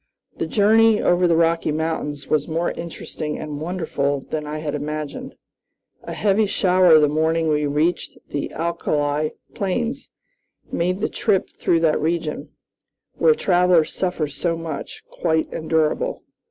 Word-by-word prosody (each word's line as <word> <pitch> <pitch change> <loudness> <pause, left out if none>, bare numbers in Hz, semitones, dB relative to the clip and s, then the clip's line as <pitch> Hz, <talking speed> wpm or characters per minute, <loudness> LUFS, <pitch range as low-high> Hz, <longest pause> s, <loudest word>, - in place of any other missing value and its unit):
The - - -2
journey 220 +1 +4
over 175 0 +3
the 170 - +3
Rocky 165 -1 +2
Mountains 150 -2 -3
was 150 -2 +1
more 165 +1 -1
interesting 155 -2 -6
and 150 -1 -6
wonderful 155 -5 -1
than 150 +2 -5
I 150 +1 -4
had 155 -1 -4
imagined. 150 0 -5 0.7
A - - -7
heavy 210 +1 +2
shower 180 -4 +5
the 150 -1 +5
morning 160 +2 +1
we 150 -1 +1
reached 150 +5 -1
the 145 - -3
alkali 155 -3 -1 0.2
plains 235 +7 -2 0.6
made 180 +3 -1
the - - +1
trip 205 -5 0
through 165 -1 +1
that 160 -2 +2
region, 160 -1 -2 0.7
where 465 - +5
travelers 180 - +3
suffer 180 -4 -1
so 165 +4 -2
much, 160 -3 -6
quite 160 -2 -1
endurable. 160 - 0
165 Hz, 140 wpm, -22 LUFS, 150-180 Hz, 0.7 s, shower